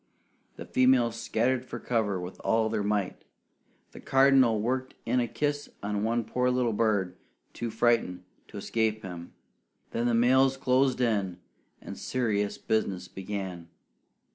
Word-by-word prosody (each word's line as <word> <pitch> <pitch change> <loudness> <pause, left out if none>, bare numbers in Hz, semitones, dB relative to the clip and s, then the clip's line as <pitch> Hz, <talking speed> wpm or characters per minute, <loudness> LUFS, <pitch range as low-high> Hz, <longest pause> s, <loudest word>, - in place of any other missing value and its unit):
The - - -8
females 125 -3 +3
scattered 120 +3 0
for - - -7
cover 105 -6 0
with 90 +1 -8
all 110 0 +2
their 110 -1 -1
might. 100 -2 -1 0.7
The - - -11
Cardinal 135 -4 +4
worked 130 +4 -2
in 125 +2 +1
a 120 - 0
kiss 145 +5 -2
on 105 0 -1
one 115 +1 +1
poor 125 0 0
little 125 -2 +1
bird, 100 -4 +1 0.4
too 120 - -4
frightened 110 -5 +1 0.2
to - - -10
escape 110 -1 -1
him; 90 -2 -8 0.6
then 120 +1 0
the 120 - +2
males 130 +3 +4
closed 130 0 +2
in, 100 -7 0 0.4
and - - -8
serious 105 -5 -1
business 95 -5 -1
began. 95 -3 -6
115 Hz, 140 wpm, -28 LUFS, 100-125 Hz, 0.7 s, Cardinal